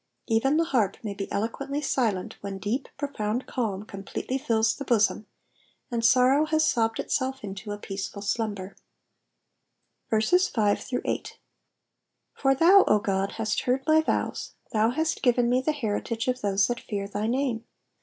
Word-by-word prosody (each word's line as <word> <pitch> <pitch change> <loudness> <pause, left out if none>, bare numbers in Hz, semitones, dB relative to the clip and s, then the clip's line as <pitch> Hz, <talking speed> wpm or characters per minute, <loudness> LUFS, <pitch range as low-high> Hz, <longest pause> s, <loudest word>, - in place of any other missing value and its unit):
Even 260 +6 +2
the 330 - +4
harp 230 - +1
may 210 -2 -3
be 195 0 -6
eloquently 275 +7 -2
silent 230 -10 -1
when 200 -1 -5
deep, 215 +8 -2
profound 250 -4 -2
calm 210 -6 -2
completely 200 +6 -4
fills 225 -5 +2
the 280 - -6
bosom, 215 -4 +2 0.6
and 235 -1 -1
sorrow 260 +5 +5
has 315 0 +2
sobbed 225 -5 +1
itself 265 0 -1
into 200 +1 -7
a 205 - -3
{>eaceful 200 0 -5
slumber. 200 -3 -2 1.3
5 220 - +2 1.4
For 270 -1 +2
thou, 365 +7 +7
O 210 - +5
God, 195 -2 -1
hast 220 -1 -1
heard 255 +2 0
my 315 0 +5
vows: 315 - -2 0.2
thou 220 +1 +3
hast 315 +6 -1
given 245 -2 +3
nu 250 +1 +3
the 310 - +1
heritage 230 -4 -2
of 255 0 0
those 195 -1 +2
that 240 -1 -2
fear 200 -2 -4
thy 205 +2 -2
name. 245 -2 -1
230 Hz, 150 wpm, -26 LUFS, 205-270 Hz, 1.4 s, thou